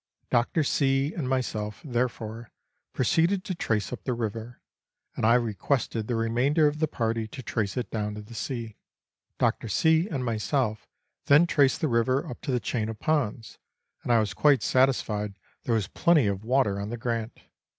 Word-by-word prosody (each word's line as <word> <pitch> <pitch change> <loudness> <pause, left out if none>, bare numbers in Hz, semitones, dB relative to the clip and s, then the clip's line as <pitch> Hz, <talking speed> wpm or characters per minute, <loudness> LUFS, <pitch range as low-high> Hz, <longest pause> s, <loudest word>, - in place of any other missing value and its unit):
Dr. 125 +7 +2
C. 135 +1 +1
and 140 -7 -3
myself, 110 -5 -2
therefore, 120 -3 -3 0.4
proceeded 170 +8 +2
to 195 -2 -3
trace 110 - -1
up - - -7
the 125 - -1
river, 115 +1 -5 0.6
and 110 - +1
I 115 - +6
requested 115 0 -1
the 120 - -1
remainder 120 +7 +2
of 150 +1 -2
the 155 - +2
party 115 -5 -2
to 130 +4 -9
trace 105 -2 -2
it 125 - -3
down 105 -1 -2
to 105 - -7
the 105 - -13
sea. 115 -1 -5 0.6
Dr. - - 0
C. 160 - +3
and 135 -6 -2
myself 115 0 -1 0.4
then, 145 +4 +7
traced 140 -5 +2
the 155 - +2
river 130 +5 +1
up 125 - -8
to - - -3
the 125 - +1
chain 110 +1 -2
of 110 - -6
ponds, 125 -6 -1 0.4
and - - -2
I 120 - +6
was 105 -2 -1
quite 145 -6 +3
satisfied 110 -6 +1 0.3
there 115 - +1
was 105 -5 0
plenty 160 - +3
of 100 0 -1
water 115 -5 +1
on 100 +1 -4
the 120 - -4
Grant. 115 -1 -3
120 Hz, 180 wpm, -27 LUFS, 110-135 Hz, 0.6 s, then